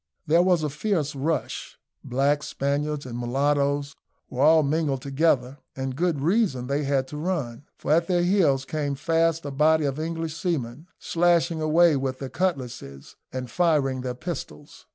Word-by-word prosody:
There 165 Hz, +3 st, +4 dB
was 180 Hz, -3 st, +2 dB
a 150 Hz, -, 0 dB
fierce 155 Hz, -2 st, -1 dB
rush, 150 Hz, +4 st, -3 dB, 0.3 s
blacks, 140 Hz, +4 st, 0 dB
Spaniards, 145 Hz, +1 st, -2 dB
and 120 Hz, -2 st, -7 dB
mulattoes 140 Hz, +3 st, 0 dB, 0.4 s
were 130 Hz, -, -2 dB
all 155 Hz, +2 st, +6 dB
mingled 140 Hz, -2 st, 0 dB
together; 140 Hz, -2 st, +1 dB, 0.2 s
and 130 Hz, -1 st, -4 dB
good 170 Hz, -2 st, 0 dB
reason 170 Hz, -, +1 dB
they 140 Hz, +2 st, -1 dB
had 135 Hz, -1 st, 0 dB
to 150 Hz, -, -7 dB
run, 150 Hz, -7 st, -3 dB
for -, -, -3 dB
at 165 Hz, +2 st, +3 dB
their 175 Hz, -2 st, +2 dB
heels 165 Hz, -8 st, +2 dB
came 145 Hz, -2 st, -2 dB
fast 165 Hz, +1 st, +1 dB
a 145 Hz, -, -4 dB
body 155 Hz, +2 st, +3 dB
of 140 Hz, +1 st, -2 dB
English 165 Hz, 0 st, -3 dB
seamen, 155 Hz, -, -3 dB
slashing 170 Hz, -1 st, +1 dB
away 160 Hz, +1 st, +4 dB
with 130 Hz, -1 st, -2 dB
their 135 Hz, -1 st, -6 dB
cutlasses, 125 Hz, -, -4 dB, 0.2 s
and 130 Hz, -2 st, -5 dB
firing 145 Hz, -7 st, +1 dB
their 125 Hz, -1 st, -4 dB
pistols. 150 Hz, 0 st, -8 dB
145 Hz, 160 wpm, -25 LUFS, 135-165 Hz, 0.4 s, all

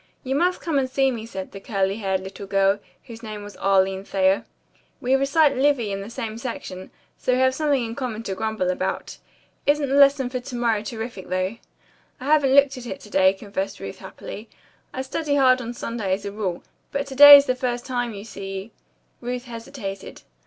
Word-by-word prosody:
"You 265 Hz, -1 st, -2 dB
must 355 Hz, +6 st, +1 dB
come 315 Hz, -5 st, 0 dB
and 260 Hz, -1 st, -1 dB
see 270 Hz, 0 st, +2 dB
me," 225 Hz, -2 st, -6 dB
said 190 Hz, -4 st, -7 dB
the 195 Hz, -, -8 dB
curly 195 Hz, -1 st, -1 dB
haired 190 Hz, -3 st, -1 dB
little 195 Hz, +1 st, -8 dB
girl, 195 Hz, +1 st, +2 dB, 0.2 s
whose 230 Hz, -3 st, -11 dB
name 215 Hz, -2 st, -7 dB
was 205 Hz, 0 st, -10 dB
Arline 195 Hz, 0 st, +2 dB
Thayer. 195 Hz, 0 st, +1 dB, 0.5 s
"We 255 Hz, +2 st, 0 dB
recite 280 Hz, +2 st, +3 dB
Livy 260 Hz, -5 st, +2 dB
in 195 Hz, 0 st, -3 dB
the 200 Hz, -, -8 dB
same 225 Hz, -1 st, -5 dB
section, 190 Hz, -6 st, -6 dB, 0.3 s
so 250 Hz, -, +1 dB
we -, -, +2 dB
have 260 Hz, 0 st, +3 dB
something 280 Hz, -3 st, +1 dB
in 225 Hz, -, -5 dB
common 235 Hz, -3 st, -4 dB
to 195 Hz, -, -3 dB
grumble 220 Hz, -3 st, -1 dB
about. 185 Hz, +1 st, -4 dB, 0.5 s
Isn't 290 Hz, -1 st, +2 dB
the -, -, 0 dB
lesson 275 Hz, -2 st, +5 dB
for 255 Hz, -, -2 dB
to 250 Hz, 0 st, -8 dB
morrow 230 Hz, -3 st, +1 dB
terrific, 220 Hz, -3 st, -6 dB
though?" 185 Hz, +4 st, -1 dB, 0.6 s
"I 255 Hz, -, -8 dB
haven't 285 Hz, -2 st, +4 dB
looked 280 Hz, -2 st, +5 dB
at 245 Hz, -, -9 dB
it 275 Hz, -, -6 dB
to 210 Hz, -, -14 dB
day," 190 Hz, 0 st, +5 dB
confessed 195 Hz, 0 st, -5 dB
Ruth 95 Hz, -, -7 dB
happily. 220 Hz, +2 st, -9 dB, 0.4 s
"I 260 Hz, -, -4 dB
study 285 Hz, +2 st, -2 dB
hard 255 Hz, -2 st, +4 dB
on 235 Hz, -1 st, -5 dB
Sunday 230 Hz, -4 st, -4 dB
as 200 Hz, -, -10 dB
a 200 Hz, -, -3 dB
rule, 195 Hz, -4 st, -3 dB, 0.3 s
but 280 Hz, 0 st, -2 dB
to 275 Hz, -, -8 dB
day 290 Hz, +1 st, +12 dB
is 280 Hz, -, +3 dB
the 255 Hz, -, +1 dB
first 245 Hz, -1 st, -3 dB
time, 245 Hz, -2 st, -2 dB
you 200 Hz, -, -8 dB
see 195 Hz, -1 st, -7 dB, 0.3 s
" -, -, -43 dB
Ruth 245 Hz, +1 st, -4 dB
hesitated. 230 Hz, -5 st, -8 dB
230 Hz, 210 wpm, -23 LUFS, 195-265 Hz, 0.6 s, day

